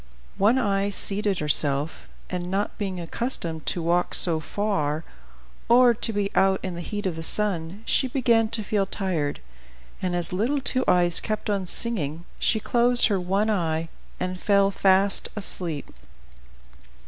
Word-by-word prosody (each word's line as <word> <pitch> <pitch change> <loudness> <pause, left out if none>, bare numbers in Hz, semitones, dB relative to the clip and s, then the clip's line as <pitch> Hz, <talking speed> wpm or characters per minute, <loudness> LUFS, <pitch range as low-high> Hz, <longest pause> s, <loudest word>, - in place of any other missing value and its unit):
One 215 +6 +4
Eye 200 -4 0
seated 200 0 +1
herself, 150 0 +2 0.2
and, 180 -1 -4
not 195 +2 -2
being 190 -3 -3
accustomed 170 -3 -4
to 175 - -1
walk 175 +2 +2
so 165 -3 +3
far, 155 -4 -2 0.7
or 245 0 +6
to 230 0 -2
be 205 -2 -2
out 190 0 +3
in 185 -2 -4
the 170 - -6
heat 205 +4 -5
of 180 -3 -1
the 165 - -6
sun, 190 +1 -2
she 265 - +1
began 235 -3 +2
to 220 -1 -3
feel 200 -1 0
tired, 175 -8 -2 0.6
and 180 -1 -1
as 175 +1 0
little 235 +10 0
Two 255 -1 0
Eyes 175 -1 +3
kept 215 0 -3
on 195 -2 -1
singing, 170 -7 -1
she 220 - +1
closed 240 +2 +2
her 200 -2 +1
one 195 +4 0
eye 165 -4 -1 0.3
and 185 0 -3
fell 200 -1 +3
fast 195 0 +3
asleep. 175 -7 -3
195 Hz, 155 wpm, -24 LUFS, 170-210 Hz, 0.7 s, or